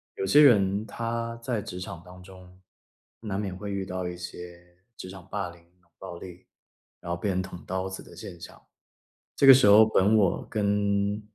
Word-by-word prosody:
有 - - -3
些 120 +11 +5
人 105 -5 +4
他 115 +1 -4
在 115 -4 -2
职 90 -2 -8
场 85 -2 -8
当 90 0 -14
中， 90 -1 -15 0.6
难 100 -3 -4
免 95 -3 -4
会 100 +2 -7
遇 100 -1 -3
到 90 -1 -4
一 90 0 -6
些 90 0 -11 0.2
职 95 - -9
场 95 -1 -12
霸 100 -3 -4
凌、 85 0 -15
冷 85 0 -32
暴 90 -3 -8
力， 90 0 -12 0.6
然 85 - -6
后 85 - -2
被 - - -2
人 95 -1 0
捅 90 -2 -9
刀 95 +1 -3
子 95 - -8
的 - - -15
现 85 - -10
象， - - -12 0.8
这 140 - +2
个 135 - +11
时 130 -4 +4
候 105 +2 +7
本 105 -1 +2
我 100 -5 +1
跟， 100 0 0
95 Hz, 210 characters per minute, -26 LUFS, 90-105 Hz, 0.8 s, 个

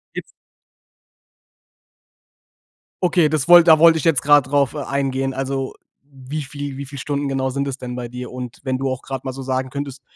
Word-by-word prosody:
Gib - - -3 2.8
Okay, 175 -3 +3
das 150 +1 -1
wollt 175 -1 +8
da 160 -1 +7
wollte 165 0 +6
ich 160 - -4
jetzt 160 -5 +3
gerade 145 -2 +4
drauf 140 -1 +2
e - - -4
eingehen. 135 -1 -1
Also, 135 0 -3 0.3
wie 140 +2 -7
viel 140 -1 -7
wie 140 - -6
viele 140 0 -9
Stunden 145 -1 -2
genau 135 -1 -1
sind 140 +2 -2
das 135 0 -4
denn 125 -2 -7
bei 120 -1 -5
dir? 125 +1 -8
Und 125 -1 -8
wenn 130 -1 -1
du 135 0 -2
auch 130 -1 -4
gerade 135 -1 -6
mal 130 - -3
so 135 - -8
sagen 130 0 -2
könntest, 140 -1 -6
135 Hz, 195 wpm, -20 LUFS, 130-145 Hz, 2.8 s, wollt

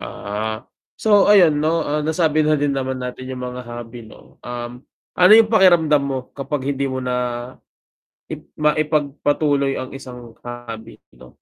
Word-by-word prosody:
Ah, 110 +2 -5 0.3
so 205 -2 +4
ayun 180 -7 +5
'no, 160 +2 +1
ah, 150 0 -1
nasabi 155 -1 +1
na 155 - +2
din 145 - +1
naman 130 -1 -3
natin 125 +1 -6
yung 125 - -6
mga 125 0 -7
hobby 120 0 -9
'no, 110 - -17
um, 120 +1 -7 0.3
ano 180 +3 +6
yung 220 0 +7
pakiramdam 175 -9 +4
mo 135 -1 -2 0.2
kapag 140 0 -4
hindi 140 -1 -1
mo 130 -1 -3
na 125 -1 -2 1.2
i - - -5 0.2
maipagpatuloy 145 -2 0
ang 130 - -5
isang 125 -4 -11
hobby 120 -2 -9 0.2
'no? 65 0 -14
135 Hz, 150 wpm, -20 LUFS, 125-155 Hz, 1.2 s, yung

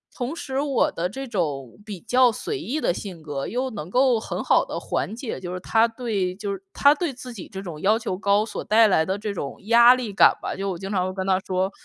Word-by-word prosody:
同 255 +5 -3
时 270 -4 -4
我 280 -2 +1
的 170 +2 -2
这 270 +5 -6
种 150 - -3
比 205 -4 -7
较 250 +1 +4
随 405 - -4
意 310 0 -3
的 - - +2
性 180 -3 -7
格， 145 -2 -4
又 255 +2 -2
能 165 -8 -6
够 255 0 +3
很 - - -4
好 - - +3
地 - - -5
缓 - - -3
解， 245 -2 -5
就 180 -1 -6
是 185 - -4
他 225 +4 +3
对 220 -6 -2
就 205 0 -4
是， 195 0 -8
他 285 +1 +5
对 315 -4 -2
自 250 0 -9
己 200 -6 -9
这 190 - -7
种 170 -6 -7
要 215 +3 +3
求 205 -6 -3
高， 200 0 +2
所 - - -6
带 225 +1 +5
来 160 -5 +3
的 190 - -1
这 210 0 -4
种 140 -7 -5
压 235 +2 +7
力 245 -4 -4
感 - - +6
吧， - - -4
就 195 0 -3
我 180 - -5
经 195 +2 -7
常 185 -2 +1
会 185 - -4
跟 190 -1 -4
他 190 -1 +3
说： 190 0 -1
205 Hz, 275 characters per minute, -24 LUFS, 185-245 Hz, -, 压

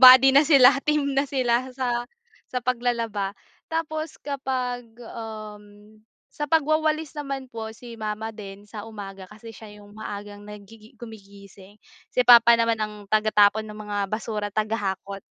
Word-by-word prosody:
buddy 260 +1 +10
na 275 - +7
sila, 275 -4 +7 0.2
team 295 -2 +2
na 275 0 +1
sila 255 -2 +1
sa 245 -2 0 0.5
sa 255 - -2
paglalaba. 230 -5 -1 0.3
Tapos 315 -1 -3
kapag, 255 -3 -3 0.2
um, 210 -2 -10 0.4
sa 295 0 -4
pagwawalis 310 0 +1
naman 275 -3 -6
po 225 -1 -5
si 240 0 -11
mama 215 +1 -4
din 200 -2 -10
sa 210 +1 -9
umaga 195 -3 -9
kasi 220 +2 -12
siya 220 0 -12
'yong 205 0 -15
maagang 205 -1 -8
nagigi 210 +1 -13
gumigising, 200 -3 -13 0.3
si 250 - +1
papa 235 -1 +8
naman 230 -1 +1
ang 210 -1 -4
taga-tapon 215 0 +3
ng 210 - -9
mga 205 0 -4
basura, 215 0 -3
taga-hakot. 200 -2 -3
225 Hz, 140 wpm, -24 LUFS, 210-255 Hz, 0.5 s, buddy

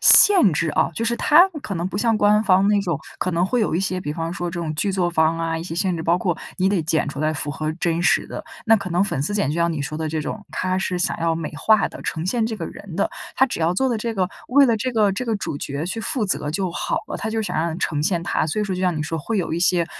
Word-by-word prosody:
限 375 - +8
制 165 +2 0
啊， 150 - +1
就 230 - -2
是 235 +1 +1
他 335 +9 +6 0.2
可 200 - -4
能 170 +1 -2
不 195 - -4
像 225 0 +2
官 210 0 +4
方 190 -1 +4
那 205 0 +3
种， 175 -7 -2 0.2
可 185 - -1
能 170 +1 +2
会 240 +6 0
有 210 - 0
一 175 - +1
些， 185 -1 -1
比 150 - -4
方 165 +2 -3
说 175 -2 -3
这 175 - -6
种 155 -2 -3
剧 200 +6 0
作 180 -2 0
方 160 0 +2
啊 165 0 -1
一 - - -5
些 165 -1 -6
限 185 +1 0
制， 160 - -4
包 170 +2 +2
括 180 -1 -1 0.2
你 185 - +1
得 190 -3 +2
剪 160 -1 0
出 140 0 -5
来 155 0 +1
符 145 0 -3
合 155 +2 -3
真 170 -1 -1
实 - - +3
的。 - - -6 0.2
那 225 -1 +6
可 200 -3 -2
能 180 +2 +2
粉 140 -9 -2
丝 205 +8 -2
剪 200 -9 +1
就 - - -2
像 170 0 +1
你 155 -3 -3
说 150 +2 -5
的 160 -1 -2
这 160 +1 -2
种， 205 +7 -5
他 185 0 -1
是 185 -1 -2
想 175 - 0
要 165 0 +1
美 160 -2 -5
化 220 +7 +3
地 - - -11
呈 160 0 -3
现 225 +3 0
这 220 -1 -4
个 170 - -5
人 195 -4 -9
的， 200 - +1 0.3
他 265 - +5
只 250 - -4
要 165 +2 +2
做 265 +7 +1
的 235 -3 0
这 230 +1 -3
个 185 -2 +1 0.2
为 280 +3 +6
了 235 -3 +3
这 255 +5 -1
个 210 -3 +3
这 250 +6 -4
个 225 -2 0
主 145 -7 -4
角 140 +3 -4
去 225 +6 -3
负 225 0 -1
责 150 -6 -1
就 185 +3 -1
好 - - -2
了， - - -5
他 220 - -3
就 220 0 -1
想 - - -4
让 165 +1 -1
呈 150 -4 -1
现 170 +1 0
他， 170 - 0
所 165 +7 -1
以 210 - 0
说 190 -2 -2
就 180 - -4
像 180 -3 +1
你 150 - -1
说 160 +2 -3
会 220 +8 -3
有 170 -4 -1
一 170 - -1
些 175 -1 +2
180 Hz, 330 characters per minute, -22 LUFS, 165-210 Hz, 0.3 s, 限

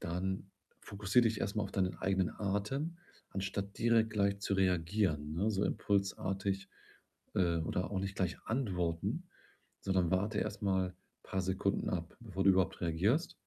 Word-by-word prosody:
dann 95 +3 -2 0.3
fokussiere 100 +4 +2
dich 110 -2 +1
erst 100 +2 -1
mal 105 - +2
auf 95 - -6
deinen 95 -2 0
eigenen 95 -2 +1
Atem, 105 - -1 0.3
anstatt 100 +1 -3
direkt 115 -1 +4
gleich 100 -1 +1
zu 100 - 0
reagieren, 90 -4 +1
ne, 100 +6 +1
so 100 -2 0
impulsartig. 95 -1 0 0.7
Äh, 85 -3 +3
oder 90 +3 -1
auch 100 - -1
nicht 95 +1 -3
gleich 90 -2 0
antworten, 90 -9 -1 0.6
sondern 95 -3 +1
warte 105 +3 +1
erst 100 0 -2
mal 95 -2 +1 0.3
paar 95 - -2
Sekunden 95 +1 0
ab, 85 -2 -3
bevor 95 -5 -3
du 95 - +8
überhaupt 95 -1 +2
reagierst. 95 - +1
95 Hz, 150 wpm, -34 LUFS, 90-100 Hz, 0.7 s, du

